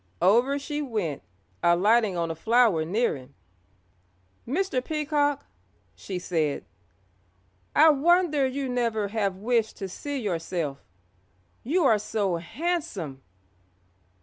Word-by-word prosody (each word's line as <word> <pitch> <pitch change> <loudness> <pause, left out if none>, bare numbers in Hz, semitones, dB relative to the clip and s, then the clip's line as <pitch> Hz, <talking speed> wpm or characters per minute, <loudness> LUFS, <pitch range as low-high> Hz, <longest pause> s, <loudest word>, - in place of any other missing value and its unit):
Over 240 +9 +4
she 295 +1 -4
went, 210 - -3 0.4
alighting 195 +3 +3
on 165 -1 -1
a - - -5
flower 225 -3 +3
near 205 +5 0
him. 135 0 -13 1.1
"Mr. 275 -2 0
Peacock," 290 -1 0 0.5
she 190 - -6
said, 160 -5 -1 1.1
"I 315 +1 +7
wonder 305 -1 +3
you 270 +1 -3
never 230 -4 -1
have 200 -3 -1
wished 225 +2 0
to 195 - -4
see 285 +9 -5
yourself, 170 - -3 0.8
you 330 +9 +1
are 220 -5 +4
so 205 -4 -1
handsome." 200 - -3
225 Hz, 110 wpm, -26 LUFS, 180-280 Hz, 1.1 s, I